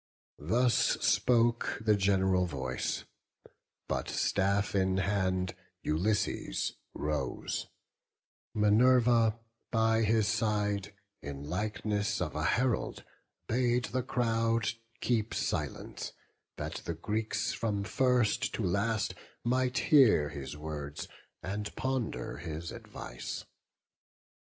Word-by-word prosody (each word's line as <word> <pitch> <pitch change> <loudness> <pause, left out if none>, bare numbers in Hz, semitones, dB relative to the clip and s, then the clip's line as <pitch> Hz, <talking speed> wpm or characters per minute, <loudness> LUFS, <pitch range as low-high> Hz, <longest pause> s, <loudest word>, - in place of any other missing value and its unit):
Thus 115 +11 +3
spoke 120 -1 +3
the 110 -1 +3
gen'ral 95 -2 +3
voice: 65 -5 -2 0.8
but, - - -2
staff 100 +1 +1
in 95 -1 +2
hand, 95 -2 0 0.3
Ulysses 95 - 0 0.2
rose; 75 -4 -2 0.9
Minerva 115 +1 +5 0.3
by 110 -1 +3
his 110 -1 +3
side, 105 -2 0 0.3
In 70 -1 -6
likeness 105 +2 -1
of 80 -4 -2
a 75 - -1
herald, 125 +5 +1 0.4
bade 125 +1 +2
the 130 - +2
crowd 115 -2 +1 0.3
Keep 115 -3 0
silence, - - -3 0.4
that - - -4
the 85 - -2
Greeks, 110 +6 -1
from 105 -3 -1
first 125 +4 +2
to 115 - -2
last, 100 +4 +1 0.3
Might 125 +1 +1
hear 115 - +6
his 70 +1 -6
words, 75 -1 -5 0.4
and 105 +2 -4
ponder 130 - -2
his 80 +1 -5
advice. - - -7
105 Hz, 100 wpm, -31 LUFS, 90-115 Hz, 0.9 s, hear